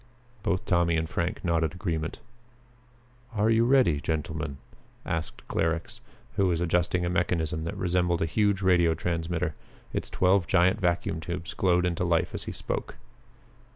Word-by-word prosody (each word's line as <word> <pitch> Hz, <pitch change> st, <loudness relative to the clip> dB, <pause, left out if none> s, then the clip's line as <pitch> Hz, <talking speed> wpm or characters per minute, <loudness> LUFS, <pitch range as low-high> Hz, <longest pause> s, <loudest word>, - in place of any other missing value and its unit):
Both 100 Hz, -4 st, -1 dB
Tommy 85 Hz, -2 st, +2 dB
and 80 Hz, 0 st, -1 dB
Frank 85 Hz, +3 st, -2 dB
nodded 80 Hz, -1 st, +1 dB
agreement. 85 Hz, -4 st, -3 dB, 1.2 s
"Are 105 Hz, +2 st, +3 dB
you 115 Hz, +1 st, +4 dB
ready, 120 Hz, -, +4 dB
gentlemen?" 80 Hz, -1 st, -3 dB, 0.5 s
asked 80 Hz, -1 st, -4 dB
Clarux, 80 Hz, 0 st, -1 dB, 0.4 s
who 95 Hz, -, +4 dB
was 85 Hz, -2 st, +1 dB
adjusting 90 Hz, +1 st, +1 dB
a -, -, 0 dB
mechanism 85 Hz, -3 st, 0 dB
that 85 Hz, -, -4 dB
resembled 90 Hz, -1 st, +1 dB
a -, -, +2 dB
huge 100 Hz, +2 st, +1 dB
radio 85 Hz, -3 st, +4 dB
transmitter. 85 Hz, 0 st, -2 dB, 0.4 s
Its -, -, -2 dB
twelve 95 Hz, -1 st, +3 dB
giant 95 Hz, +3 st, +3 dB
vacuum 85 Hz, -2 st, 0 dB
tubes 85 Hz, +1 st, -5 dB
glowed 90 Hz, -1 st, +2 dB
into 90 Hz, 0 st, 0 dB
life 85 Hz, -2 st, +1 dB
as -, -, -5 dB
he -, -, -4 dB
spoke. -, -, -4 dB
85 Hz, 150 wpm, -27 LUFS, 80-90 Hz, 1.2 s, you